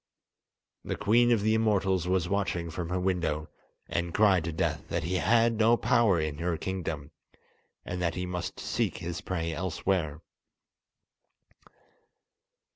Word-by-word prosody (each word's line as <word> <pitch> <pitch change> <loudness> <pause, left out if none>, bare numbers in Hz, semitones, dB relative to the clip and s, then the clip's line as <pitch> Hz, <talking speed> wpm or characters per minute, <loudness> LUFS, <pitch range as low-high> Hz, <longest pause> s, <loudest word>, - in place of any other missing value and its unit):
The - - -3
Queen 120 +3 +3
of 115 -3 +3
the 110 +1 +3
Immortals 100 -5 +1
was 90 -2 +1
watching 90 -4 -1
from 85 0 -4
her 90 +1 -1
window, 85 -5 -1 0.4
and 85 0 -2
cried 100 -5 +4
to 85 - -2
Death 80 - -2
that - - -1
he 90 +3 -1
had 115 +3 +3
no 115 +2 +5
power 115 -9 +3
in 75 -1 -3
her 85 -1 -1
kingdom, 80 -5 -4 0.7
and 90 0 -4
that 85 -1 0
he 90 0 -2
must 90 -1 -4
seek - - -1
his 85 +2 -5
prey 85 -4 -2
elsewhere. 85 -3 -1
90 Hz, 140 wpm, -29 LUFS, 85-100 Hz, 0.7 s, no